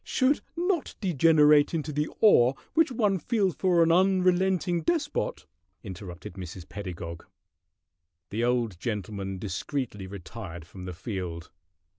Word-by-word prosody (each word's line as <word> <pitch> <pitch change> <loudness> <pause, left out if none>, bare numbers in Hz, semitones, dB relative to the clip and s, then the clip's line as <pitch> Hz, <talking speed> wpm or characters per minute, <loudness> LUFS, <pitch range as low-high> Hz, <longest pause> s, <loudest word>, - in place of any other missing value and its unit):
"Should 265 +2 +2 0.2
not 350 -2 0
degenerate 150 -4 +4
into 155 -1 -3
the 150 +2 -1
awe 130 - +6 0.2
which 320 -3 +3
one 210 -6 +1
feels 200 -2 +1
for 180 -3 +3
an 165 - +3
unrelenting 185 -1 +3
despot!" 335 - -1 0.4
interrupted 90 -4 -8
Mrs. 90 -2 -8
Pedagog. 85 -4 -7 1.0
The 110 +4 -1
old 120 -7 0
gentleman 100 -3 -4
discreetly 105 - -4
retired 90 -2 -8
from 90 +2 -10
the 90 - -5
field. 90 -3 -5
130 Hz, 120 wpm, -27 LUFS, -, 1.0 s, awe